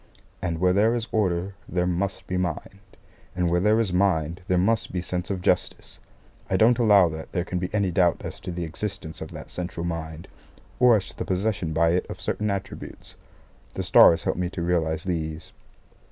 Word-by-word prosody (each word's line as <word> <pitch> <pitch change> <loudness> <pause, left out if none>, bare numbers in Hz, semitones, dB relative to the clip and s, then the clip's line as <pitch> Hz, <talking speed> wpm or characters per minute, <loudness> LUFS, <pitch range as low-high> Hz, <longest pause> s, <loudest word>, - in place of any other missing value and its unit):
And 85 -3 -2
where 90 +1 +3
there 110 +4 +3
is 120 0 -2
order 95 -3 0 0.2
there 90 0 0
must 90 +2 -2
be 90 - -3
mind, 90 +2 -3 0.6
and 90 -1 +1
where 90 - +3
there 105 +4 +3
is 105 -6 0
mind 90 -2 +1
there 90 - +2
must 105 +5 +1
be 90 - -2
sense 90 0 -3
of 95 -3 -3
Justice. - - -1 0.5
I 95 - +2
don't 115 +4 +4
allow 105 -6 +6
that 80 0 -8
there 90 -1 -1
can 90 - -3
be 90 +1 -3
any 100 -3 +1
doubt 90 -1 +2
as - - -7
to - - -6
the 85 0 -4
existence 90 +1 -6
of - - -6
that - - -9
central 85 -1 -4
Mind, 80 -1 -5 0.5
or 125 -2 +7
as 100 - -1
to - - -13
the - - -1
possession 95 -3 -1
by 80 +1 +3
it 90 +2 0
of - - -7
certain 105 0 -2
attributes. 100 -1 -5 0.6
The - - -2
stars 85 - +6
help - - -1
me 90 -1 -1
to 85 -1 -5
realise 80 -2 0
these. 80 -3 -4
90 Hz, 200 wpm, -25 LUFS, 85-100 Hz, 0.6 s, or